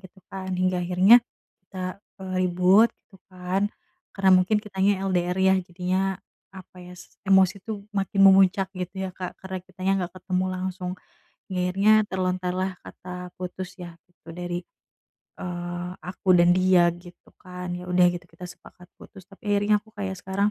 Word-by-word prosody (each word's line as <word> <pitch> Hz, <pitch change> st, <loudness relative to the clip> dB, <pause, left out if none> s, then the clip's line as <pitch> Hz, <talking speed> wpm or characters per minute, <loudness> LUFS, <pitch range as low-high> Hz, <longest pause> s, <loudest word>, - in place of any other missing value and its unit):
gitu 190 Hz, 0 st, -16 dB
kan, 190 Hz, -1 st, -6 dB
hingga 185 Hz, 0 st, +1 dB
akhirnya 185 Hz, +7 st, +6 dB, 0.5 s
kita, 185 Hz, -1 st, -5 dB, 0.2 s
eee, 185 Hz, -1 st, -5 dB
ribut 185 Hz, +5 st, +4 dB, 0.2 s
gitu 195 Hz, -, -18 dB, 0.2 s
kan, 185 Hz, +2 st, -1 dB, 0.4 s
karena 195 Hz, -1 st, +2 dB
mungkin 210 Hz, +4 st, +2 dB
kitanya 195 Hz, -2 st, 0 dB
LDR 180 Hz, -1 st, 0 dB
ya 190 Hz, 0 st, +5 dB
jadinya 185 Hz, +2 st, -2 dB, 0.3 s
apa 185 Hz, -1 st, -13 dB
ya, 180 Hz, -, -11 dB
s -, -, -15 dB
emosi 190 Hz, 0 st, +3 dB
tuh 210 Hz, -3 st, -6 dB
makin 195 Hz, 0 st, 0 dB
memuncak 190 Hz, 0 st, +4 dB
gitu 185 Hz, +1 st, -5 dB
ya 190 Hz, -, -4 dB
Kak, 185 Hz, -1 st, -6 dB
karena 190 Hz, 0 st, -6 dB
kitanya 185 Hz, +1 st, -2 dB
gak 185 Hz, +1 st, -14 dB
ketemu 185 Hz, 0 st, -1 dB
langsung, 185 Hz, -1 st, -4 dB, 0.6 s
hingga 185 Hz, -1 st, -2 dB
akhirnya 195 Hz, +3 st, +3 dB, 0.2 s
terlontarlah 185 Hz, 0 st, -1 dB
kata 180 Hz, 0 st, -9 dB
putus 185 Hz, 0 st, -7 dB
ya 175 Hz, -2 st, -9 dB, 0.2 s
gitu 175 Hz, -2 st, -18 dB
dari, 175 Hz, 0 st, -4 dB, 0.8 s
eee, 175 Hz, 0 st, -5 dB
aku 180 Hz, +3 st, -8 dB
dan 175 Hz, 0 st, +5 dB
dia 185 Hz, -1 st, +4 dB
gitu 175 Hz, 0 st, -16 dB
kan, 180 Hz, -1 st, -7 dB
ya 180 Hz, 0 st, -8 dB
udah 180 Hz, 0 st, +5 dB
gitu 175 Hz, 0 st, -8 dB
kita 165 Hz, +2 st, -11 dB
sepakat 180 Hz, 0 st, -16 dB
putus, 195 Hz, -4 st, -14 dB
tapi 195 Hz, +2 st, -15 dB
akhirnya 205 Hz, +1 st, +3 dB
aku 220 Hz, -, -22 dB
kayak 195 Hz, -2 st, -4 dB
sekarang 195 Hz, +3 st, 0 dB
185 Hz, 160 wpm, -25 LUFS, 180-190 Hz, 0.8 s, akhirnya